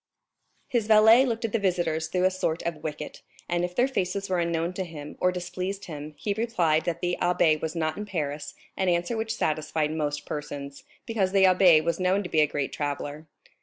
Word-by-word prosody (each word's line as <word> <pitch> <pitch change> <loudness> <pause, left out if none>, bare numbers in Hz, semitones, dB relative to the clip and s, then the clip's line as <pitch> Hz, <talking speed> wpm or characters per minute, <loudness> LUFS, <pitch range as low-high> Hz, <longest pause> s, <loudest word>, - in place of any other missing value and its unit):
His 230 -4 0
valet 220 +4 +7
looked 230 -1 -2
at 225 - -3
the 230 - +1
visitors 170 -5 0
through 180 +2 -1
a 185 - +4
sort 175 -3 -2
of 170 -2 -2
wicket; 155 -1 -6 0.3
and 175 0 0
if 180 0 -3
their 250 - +3
faces 195 -5 -2
were 180 - +2
unknown 170 +1 -1
to 190 - -3
him 150 -4 -9
or 180 - +3
displeased 185 +2 -4
him, 150 -2 -8
he 205 - -2
replied 180 -8 +1
that 170 -2 -2
the 175 0 -1
abbé 170 -3 +3
was 160 +1 -3
not 155 -1 -1
in 210 0 -5
Paris, 150 -6 -4 0.2
an 190 -1 0
answer 175 +6 0
which 220 0 -2
satisfied 155 -2 -1
most 150 -2 -2
persons, 145 -2 -6 0.2
because 200 -5 0
the 195 -1 +5
abbé 180 -4 +6
was 170 +2 -1
known 185 +2 +2
to 180 - -6
be 155 - +3
a 150 - +4
great 145 -1 -3
traveller. 145 +1 -4
175 Hz, 205 wpm, -26 LUFS, 155-195 Hz, 0.3 s, valet